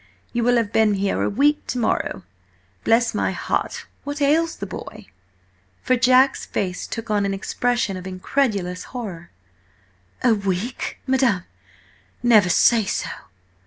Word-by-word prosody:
You 235 -1 0
will 245 +1 +3
have 230 -3 0
been 220 -2 +4
here 195 0 0
a - - +1
week 290 +7 +2
to - - -3
morrow. 220 - -1 0.6
Bless 230 +1 +3
my - - 0
heart, - - -2 0.2
what 285 +1 -5
ails 320 +3 +2
the - - -6
boy?" - - -9 0.8
For 255 - +3
Jack's 255 +2 +4
face 180 -2 -3
took 225 -1 -5
on 205 -1 +2
an 195 0 -1
expression 240 +1 -1
of 185 0 -7
incredulous 185 -2 -1
horror. 180 -8 -6 0.9
"A 245 -2 +5
WEEK, 200 +3 -3
madam? 260 -8 +2 0.8
Never 215 -6 +5
say 225 +5 +4
so!" 195 - -2
230 Hz, 140 wpm, -22 LUFS, 195-255 Hz, 0.9 s, A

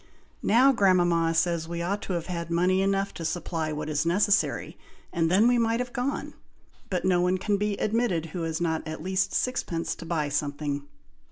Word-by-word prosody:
Now 250 +6 +5
grandmama 175 -7 +3
says 165 -1 +1
we 170 0 -3
ought 200 +4 -1
to 190 - -4
have 170 -2 -2
had 170 -2 -4
money 180 +3 +2
enough 195 0 0
to 165 - -7
supply 165 -1 -2
what 150 0 -4
is 150 -1 0
necessary, 200 +4 +1 0.4
and 165 -2 +1
then 200 +6 +5
we 245 0 +4
might 230 0 +1
have 250 0 -4
gone, 265 +2 -2 0.6
but 185 -1 -1
no 180 -2 +3
one 180 +1 +2
can 205 +2 0
be 205 0 -1
admitted 215 -7 0
who 180 - -3
has 160 -1 -2
not 160 -2 0
at 155 0 -6
least 190 +1 0
sixpence 180 -10 -1
to 170 - -10
buy 160 -3 0
something." 145 0 -2
175 Hz, 190 wpm, -27 LUFS, 165-200 Hz, 0.6 s, Now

